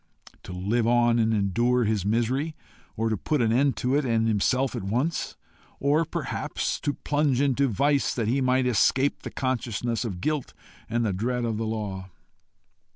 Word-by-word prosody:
To - - -10
live 105 +6 0
on 120 0 +3
and 110 0 +2
endure 115 +4 +2
his 105 -3 0
misery, 130 +8 0 0.4
or 115 +1 0
to 110 - +1
put 150 +9 -1
an 115 -2 +2
end 135 +2 +2
to 125 +1 0
it 145 - +2
and 115 -3 +1
himself 125 +5 +1
at 120 - -3
once? 125 - -1 0.4
Or 150 +4 +2
perhaps - - -3
to 145 -1 -2
plunge 145 -3 0
into 140 0 +2
vice 140 +5 +1
that 115 -4 -1
he 130 +4 +1
might 130 0 +2
escape 125 +4 +2
the - - -6
consciousness 120 -2 -2
of 100 -7 -4
guilt 150 +6 -2 0.3
and 120 +1 0
the 105 - 0
dread 120 +5 -1
of 115 -2 -2
the 110 0 -2
law? 100 -4 -4
120 Hz, 175 wpm, -26 LUFS, 110-135 Hz, 0.4 s, on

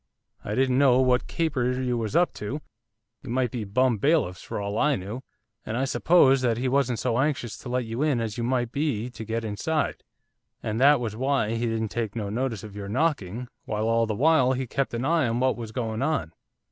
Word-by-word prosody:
I 105 - -3
didn't 130 0 +2
know 130 -3 +5
what 125 -1 +2
caper 140 -7 0
you 125 -1 0
was 115 +3 -3
up 175 +1 +3
to, 120 +8 -4 0.6
you 130 - -10
might 125 -1 0
be 120 -3 -3
bum 120 +2 +2
bailiffs 140 - +1
for - - -5
all 100 +1 -2
I 150 -1 +3
knew! 105 +6 -6 0.4
and 110 - -3
I 135 - +1
supposed 135 -2 +4
that 115 -2 +2
he 130 +2 -1
wasn't 130 -2 +1
so 120 0 0
anxious 135 -5 -1
to 125 - -8
let 125 0 -1
you 115 +4 -4
in 150 -5 +2
as 110 -2 -3
you 120 - -3
might 120 -1 0
be 130 -5 -1
to 120 - -8
get 115 +1 -3
inside, 145 +9 -1 0.6
and 110 +1 -2
that 145 +1 +6
was 115 -3 -3
why 130 -2 0
he 115 +1 -1
didn't 110 -1 -1
take 110 -1 -3
no 105 -3 -3
notice 115 -2 -2
of 105 -2 -9
your 100 -1 -6
knocking, 125 - -1 0.2
while 110 0 -1
all 115 0 +2
the 110 - -2
while 135 -1 +4
he 130 0 -2
kept 135 +3 -2
a 115 - -2
eye 160 -1 +2
on 115 +1 -1
what 130 +1 +2
was 115 -3 -7
going 110 -1 -3
on. 140 - -1
125 Hz, 225 wpm, -26 LUFS, 110-135 Hz, 0.6 s, that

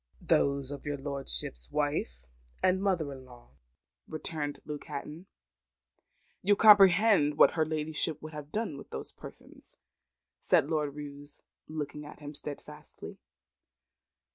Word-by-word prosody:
"Those 140 -1 +2
of 145 - -6
your 145 -1 -3
lordship's 135 - -4
wife 145 - -1 0.4
and 185 +1 +3
mother 180 -7 +1
in 130 -1 -10
law," 120 - -16 0.6
returned 155 -2 -4
Luke 150 -1 -6
Hatton. 150 +4 -7 1.1
"You 205 +2 +4
comprehend 200 -6 +7
what - - +7
her 160 -2 +1
ladyship 155 0 -2
would 155 +1 -9
have 150 -1 -8
done 210 -10 -2
with - - -12
those - - -6
persons?" - - -13 0.6
said - - +3
Lord 150 -3 0
Roos, 145 0 -9 0.3
looking 150 -1 -5
at 150 - -11
him 145 0 -8
steadfastly. 150 0 -9
150 Hz, 125 wpm, -30 LUFS, 140-160 Hz, 1.1 s, comprehend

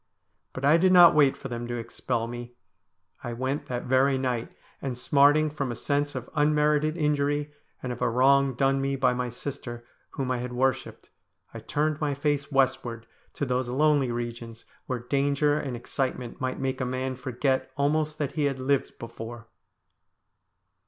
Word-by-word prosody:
But 130 - -4
I 150 +3 +6
did 185 +2 +4
not 175 -2 +9
wait 145 -3 +4
for - - -7
them 120 -1 -5
to 120 - -3
expel 115 0 -3
me. 120 +1 -8 0.7
I 120 - -4
went 135 +4 -3
that 125 -2 -3
very 130 +2 +3
night, 125 -3 -2 0.3
and, 130 -3 -4
smarting 145 +4 +4
from 140 -4 -3
a - - -4
sense 145 +3 -1
of 125 -1 -5
unmerited 150 +1 +2
injury, 145 -1 0 0.3
and 125 -1 -2
of 120 - -10
a - - +2
wrong 135 +2 +3
done 135 +1 +2
me 135 0 0
by 130 -2 +2
my 125 0 -2
sister 125 -1 -7 0.3
whom 130 -2 -2
I 130 - 0
had 125 0 -5
worshipped, 130 0 -1 0.4
I - - -6
turned 150 +1 -1
my 145 -2 0
face 145 0 -1
westward 130 -4 0 0.3
to 145 - -1
those 125 -1 -1
lonely 140 -1 +2
regions 120 -1 -6 0.2
where 130 - -1
danger 140 +4 +1
and 135 -4 -4
ex 120 - -11
citement 130 -1 -3
might 130 0 -2
make 130 0 -2
a - - +1
man 130 +1 -2
forget 130 +1 -1
almost 150 +2 +1
that 145 -3 -2
he 150 -1 0
had 140 -2 0
lived 135 +1 -1
before. 115 0 -9
135 Hz, 175 wpm, -27 LUFS, 125-145 Hz, 0.7 s, not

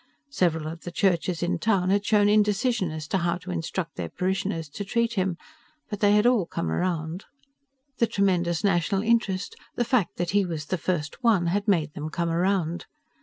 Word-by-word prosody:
Several 165 - +1
of 165 +1 -6
the - - -6
churches 175 -2 +1
in 175 0 0
town 190 -2 +2
had 200 0 +2
shown 205 -1 +3
indecision 210 -1 +2
as 155 -1 -6
to 190 - +1
how 170 0 0
to 180 +1 -8
instruct 165 -1 -4
their 85 -2 -3
parishioners 185 - -2
to 205 - -5
treat 235 +3 0
him. 185 -4 0 0.5
But 210 - -3
they 205 -1 +4
had 210 +1 +4
all 240 -8 +3
come 80 - -3
around. 170 - -2 0.7
The 235 - +4
tremendous 180 -4 +1
national 195 +1 +1
interest, 225 - +1 0.2
the 240 - 0
fact 240 -6 +1
that 175 0 -1
he 200 0 +3
was 165 -4 -4
the 185 +3 -2
First 165 - -2
One, 215 -7 +4
had 205 +1 -1
made 160 -7 +2
them 150 +1 -5
come 170 +1 -1
around. 175 -1 0
185 Hz, 190 wpm, -26 LUFS, 170-205 Hz, 0.7 s, they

